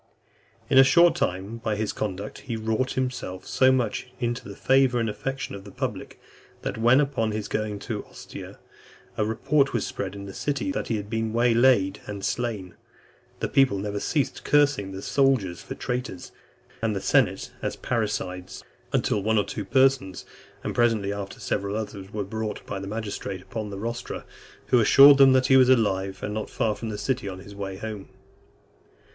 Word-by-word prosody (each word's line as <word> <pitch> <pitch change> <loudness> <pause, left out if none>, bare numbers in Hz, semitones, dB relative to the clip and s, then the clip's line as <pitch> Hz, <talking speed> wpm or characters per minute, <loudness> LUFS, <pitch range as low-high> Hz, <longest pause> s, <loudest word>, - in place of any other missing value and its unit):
In 135 - +5
a - - +10
short 170 +6 +6
time, 95 +5 -2
by 110 -2 -1
this 105 0 -2
conduct, 100 0 -4
he 120 -4 -5
wrought 110 +3 -1
himself 125 -8 -3
so 130 +1 +4
much 125 -3 0
into 120 -4 -3
the 100 - -8
favour 130 +1 +3
and 115 - 0
affection 135 +6 -4
of 100 -1 -8
the 100 - -11
public, - - -5 0.4
that - - -2
when, 120 +4 +5
upon 135 -6 0
his 105 -1 -3
going 110 -1 -2
to - - -4
Ostia, - - -10 0.6
a 110 - +1
report 135 +6 +1
was 120 - 0
spread 100 0 -4
in 100 0 -7
the 100 - -8
city 145 +3 -2
that 140 - -3
he 115 - 0
had 105 -1 -6
been 110 0 -2
way 120 0 +3
laid 115 -5 +3
and 100 -2 -5
slain, 110 -7 -2 0.7
the - - 0
people 135 -7 +3
never 100 +1 -3
ceased 145 +5 -1
cursing 145 -10 +2
the 95 0 -7
soldiers 130 -11 +1
for - - -7
traitors, 125 -7 -4 0.5
and 110 -2 0
the - - -1
senate - - +1
as - - -2
parricides, 95 -5 -3 0.3
until 105 - +1
one 110 +2 +1
or 105 - +4
two 105 - -5
persons, 125 -3 +2 0.4
and - - -3
presently 110 -4 +2
after 100 -1 -6
several 100 +1 -2
others, 100 -3 -5
were 105 -1 -2
brought 110 +2 -5
by 100 - -4
the 95 - -6
magistrates 100 -3 -5
upon 105 +2 -5
the 100 - -6
rostra, 115 +4 -5 0.4
who 125 - +5
assured 140 +5 +8
them 135 -1 +8
that 130 0 +4
he 135 0 +6
was 130 -1 +6
alive, 95 -6 +1
and 105 - -3
not 110 0 -4
far 110 - 0
from 115 +1 -6
the 105 - -4
city, 125 -3 -2
on 95 - -7
his 100 +2 -11
way 100 -1 -5
home. 105 -1 -7
110 Hz, 185 wpm, -25 LUFS, 100-125 Hz, 0.7 s, a